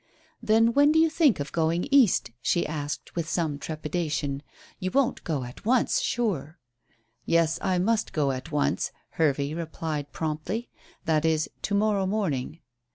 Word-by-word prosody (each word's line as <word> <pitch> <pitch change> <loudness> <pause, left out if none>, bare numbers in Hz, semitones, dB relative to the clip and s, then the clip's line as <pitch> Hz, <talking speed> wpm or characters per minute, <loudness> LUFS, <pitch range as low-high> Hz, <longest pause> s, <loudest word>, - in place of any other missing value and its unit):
"Then 225 +2 +4
when 285 +3 +5
do 315 - +3
you 320 0 +4
think 310 - +3
of 145 - -4
going 165 +4 0
East?" 250 - +4
she 175 - +1
asked, 150 -1 -5
with 165 -2 -2
some 155 -5 -1
trepidation. 150 -3 -3 0.4
"You 185 - -2
won't 270 +3 +1
go 150 -6 -2
at 125 +7 -10
once, 240 +2 +2
sure." 180 - -1 0.7
"Yes, 165 0 +2
I 185 -2 +1
must 220 +5 +1
go 145 -3 +1
at 130 0 -6
once," 145 0 0 0.2
Hervey 145 -2 0
replied 160 -3 -4
promptly. 160 +9 -3 0.3
"That 155 -1 +2
is, 160 -1 +1
to 205 - -1
morrow 200 -2 +2
morning." 165 -7 -2
165 Hz, 155 wpm, -26 LUFS, 150-210 Hz, 0.7 s, when